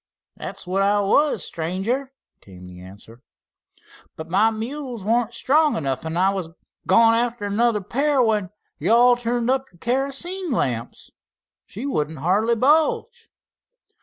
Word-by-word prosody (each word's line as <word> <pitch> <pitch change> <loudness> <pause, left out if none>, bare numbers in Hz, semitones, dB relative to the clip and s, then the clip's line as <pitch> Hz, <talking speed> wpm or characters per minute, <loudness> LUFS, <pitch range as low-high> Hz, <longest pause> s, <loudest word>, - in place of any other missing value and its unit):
"That's 195 0 -7
what 185 +2 -1
I 205 +1 +2
was, 280 +9 +2
stranger" 195 +12 -3 0.3
came 90 -2 -14
the 90 0 -12
answer. 100 +6 -14 0.9
"But 160 +1 -9
my 200 +5 +3
mules 240 +1 -6
wa'n't 230 +2 0
strong 300 +2 +2
enough. 135 0 -3
I 180 +4 +1
was 185 -4 -4 0.4
goin' 230 0 +5
arter 235 -2 -1
another 210 +1 +1
pair 275 +8 0
when 215 -6 +1 0.3
yo' 195 +10 +3
all 245 +1 +6
turned 240 0 -1
up 265 0 0
your 175 - -22
kerosene 275 - -2
lamps. 120 - -3 0.6
She 225 +7 -7
wouldn't 155 - -2
hardly 200 +10 +1
budge." 320 - +1
225 Hz, 135 wpm, -22 LUFS, 180-260 Hz, 0.9 s, all